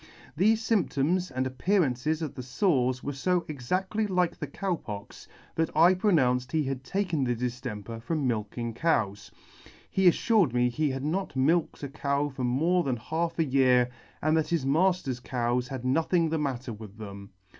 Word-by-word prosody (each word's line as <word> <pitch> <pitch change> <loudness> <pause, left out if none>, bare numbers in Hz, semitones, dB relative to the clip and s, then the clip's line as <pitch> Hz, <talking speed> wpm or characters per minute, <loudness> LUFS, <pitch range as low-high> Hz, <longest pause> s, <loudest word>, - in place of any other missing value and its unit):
Thefe 200 +7 +4
fymptoms 185 -6 0
and 130 0 -2
appearances 155 0 0
of 150 - -4
the - - -6
fores 130 - +1
were 145 - -3
fo 175 +6 0
exactly 185 - -1
like 180 -3 +1
the - - -5
Cow 190 -2 -2
Pox, 105 -9 -9 0.3
that 160 0 0
I 170 +3 +7
pronounced 130 -11 +2
he 155 -1 +2
had 135 -1 -3
taken 175 0 -1
the 120 -1 0
diflemper 115 -3 -5
from 150 +3 -2
milking 115 0 -2
cows. 105 - 0 0.6
He 190 -1 +3
afllired 180 - +3
me 125 0 +3
he 150 +4 0
had 135 0 -3
not 170 +1 -2
milked 150 +4 +1
a - - -2
cow 140 +1 -1
for 135 -2 -6
more 160 +9 +2
than 130 -5 -1
half 165 +8 -2
a 165 - +2
year, 130 -3 +3 0.3
and 155 +1 +3
that 160 -1 +1
his 165 -6 0
mafter's 155 -3 +1
cows 125 0 -1
had 130 -3 -6
nothing 165 +5 +2
the 160 0 -1
matter 130 -4 -3
with 105 -1 -11
them. 100 -2 -9
140 Hz, 175 wpm, -28 LUFS, 125-170 Hz, 0.6 s, I